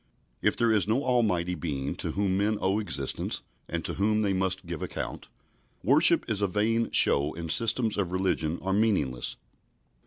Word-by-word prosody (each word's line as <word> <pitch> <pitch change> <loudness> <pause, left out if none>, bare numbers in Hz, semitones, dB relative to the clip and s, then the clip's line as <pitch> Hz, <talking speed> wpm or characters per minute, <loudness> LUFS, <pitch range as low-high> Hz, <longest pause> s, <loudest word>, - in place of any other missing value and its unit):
If - - +1
there 115 -1 +3
is 105 -3 +2
no 120 +6 +1
Almighty 100 -9 +1
Being 70 -6 -3
to - - -3
whom 100 -1 0
men 105 +2 +1
owe 95 +3 +1
existence, 70 -10 -3 0.3
and 85 0 -3
to - - -2
whom 105 +2 +1
they 100 -2 +1
must 95 0 -1
give 85 -2 -5
account, - - -5 0.6
worship 155 +6 +4
is 110 -3 -1
a 100 - +2
vain 110 +4 0
show 70 +3 +3
and 80 -1 -4
systems 115 0 +1
of 90 -3 -1
religion 90 -3 0
are 95 0 0
meaningless. 95 - 0
95 Hz, 175 wpm, -28 LUFS, 85-110 Hz, 0.6 s, worship